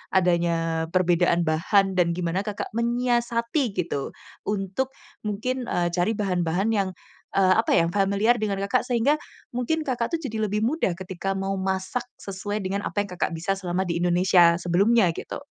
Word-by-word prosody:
adanya 170 -2 +2
perbedaan 175 -1 +3
bahan 190 +5 +2
dan 170 -1 +3
gimana 175 +1 -1
Kakak 210 -1 -4
menyiasati, 235 +1 0
gitu, 165 -6 -2 0.3
untuk 210 +6 -2 0.3
mungkin, 250 +5 -2
eee, 175 0 0
cari 180 +5 +1
bahan-bahan 185 -1 0
yang, 200 -4 +1 0.4
eee, 190 -1 +4
apa, 225 - +2
yang 170 0 +4
familiar 200 +5 +2
dengan 200 -3 -1
Kakak? 220 +6 +1
Sehingga, 250 +5 +2 0.4
mungkin 315 +6 0
Kakak 255 +1 -2
tuh 330 - +1
jadi 225 -6 -4
lebih 210 +1 -1
mudah 235 - +1
ketika 190 +1 -4
mau 195 0 -2
masak 190 +5 -2 0.2
sesuai 205 +2 -4
dengan 195 +2 -2
apa 205 - -1
yang 200 - -5
Kakak 180 -1 -2
bisa, 190 +4 -1
selama 180 -1 -2
di 170 - 0
Indonesia 175 0 +4
sebelumnya, 195 +3 +3
gitu. - - -6
195 Hz, 160 wpm, -25 LUFS, 175-225 Hz, 0.4 s, eee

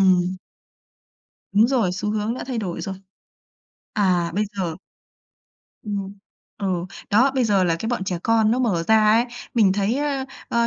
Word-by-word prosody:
Ừm. 185 -1 +3 1.2
Đúng 210 +3 +5
rồi, 235 -9 +1
xu 200 +3 -2
hướng 215 +2 -1
đã - - -6
thay 255 -3 -3
đổi 185 -6 -3
rồi. 195 -2 -4 1.0
À, 180 -5 +2
bây 210 +2 +1
giờ 175 -4 -2 1.1
ừm. 200 -1 -5 0.4
Ừ. 200 - -2 0.4
Đó, 250 +7 +5
bây 260 -2 +2
giờ 200 -4 +3
là 165 -2 +1
cái 225 - -3
bọn 240 -6 -1
trẻ 180 -2 -2
con 225 -1 +3
nó 240 - +2
mở 210 -10 +1
ra 220 -1 +5
ấy, 230 +2 +4 0.3
mình 210 -5 +4
thấy, 205 +4 0
ơ, 285 -2 -1 0.2
ơ, 235 0 +2
210 Hz, 170 wpm, -23 LUFS, 190-230 Hz, 1.2 s, Đúng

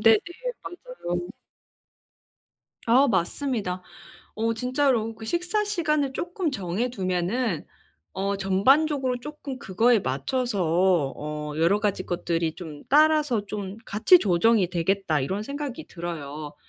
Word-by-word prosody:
네네. 220 0 +6 0.4
맞아요. 350 - -5 1.6
아 255 +5 +5
맞습니다. 195 -1 -1 0.5
어 230 +1 0
진짜로 250 -2 +1
그 220 0 -10
식사 355 - 0
시간을 305 -9 0
쪼끔 350 +1 -2
정해 200 0 -2
두면은 185 - -1 0.5
어 195 +1 -1
전반적으로 255 +7 +2
쪼끔 285 -1 -7
그거에 230 0 +3
맞춰서 175 - +1
어 150 0 -5
'여러 170 +5 +3
가지 200 -3 -1
것들이 170 -2 -1
좀 155 -5 -9
따라서 300 -6 +4
좀 200 -1 -5
같이 220 - +5
조정이 195 - +3
되겠다.' 175 -2 0
이런 190 +10 -2
생각이 285 +2 -5
들어요. 155 -4 -6
210 Hz, 250 characters per minute, -25 LUFS, 175-270 Hz, 1.6 s, 네네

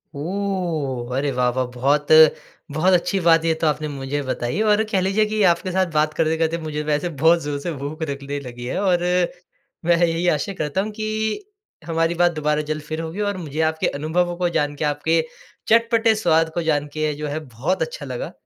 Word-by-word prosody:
ओह! 160 -8 -2
अरे 140 +1 0
वाह, 125 -1 +1
वाह! 130 -1 +1
बहुत 140 +4 +1 0.6
बहुत 175 +6 +2
अच्छी 185 +3 +2
बात 165 -1 +5
है - - 0
ये 160 - +3
तो 160 - +3
आपने 150 0 0
मुझे 140 0 -3
बताई। 130 - -2
और 215 0 +3
कह 190 -3 +2
लीजिए 195 +3 +2
कि 215 0 -1
आपके 175 +2 -2
साथ 190 +1 +2
बात 155 0 +2
करते-करते 160 +1 +1
मुझे 150 -1 -3
वैसे 150 +3 0
बहुत 165 +1 +5
जोर 145 -1 -3
से 170 - -4
भूख 145 +3 -6
लगने 140 +1 -4
लगी 120 -3 -8
है 130 - -2
और, 180 -3 +2 0.8
मैं 175 0 +4
यही 170 0 +1
आशा 160 +5 0
करता 155 +5 -1
हूँ, 215 +2 -2
कि 220 - -3 0.4
हमारी 165 0 0
बात 175 0 +3
दोबारा 150 -1 0
जल्द 155 0 -2
फिर 155 +2 -5
होगी 165 +5 -5
और 200 - -4
मुझे 155 -3 -5
आपके 160 0 -2
अनुभवों 175 +4 -1
को 180 0 0
जान 145 -3 0
के 150 - -3
आपके 150 +3 +1 0.5
चटपटे 230 0 +4
स्वाद 165 -6 +2
को 170 - -1
जान 150 -2 +1
के 155 0 -1
जो 150 +1 -5
है 150 +2 -3
बहुत 130 +10 -2
अच्छा - - -4
लगा। - - -5
160 Hz, 200 wpm, -22 LUFS, 145-180 Hz, 0.8 s, बात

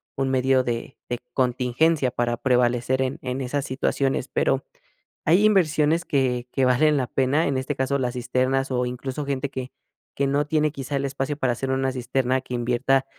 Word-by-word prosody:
un 135 -1 0
medio 130 0 +3
de 120 +1 -4
de 120 -1 -2
contingencia 130 +3 +1
para 120 0 -1
prevalecer 125 +1 +1
en 130 0 -2
en 130 +1 -3
esas 135 +2 -2
situaciones, 135 0 -1
pero 135 0 +1 0.6
hay 180 +6 +4
inversiones 165 -5 +3
que 125 -4 0
que 135 - +1
valen 145 +4 +4
la 130 -3 0
pena, 135 +6 +1
en 140 - 0
este 130 +2 -2
caso 130 +1 0
las 125 -1 -1
cisternas, 130 +2 0
o 125 -1 0
incluso, 130 +3 -4
gente 140 0 -2
que 130 -1 -5 0.5
que 140 - +1
no 145 +1 +1
tiene, 155 0 +1
quizá, 140 -1 -6
el 140 0 0
espacio 135 +1 -3
para 130 -4 0
hacer 130 +3 -3
una 135 0 +1
cisterna 130 0 0
que 130 -1 -7
invierta 125 +3 +1
130 Hz, 180 wpm, -24 LUFS, 125-140 Hz, 0.6 s, hay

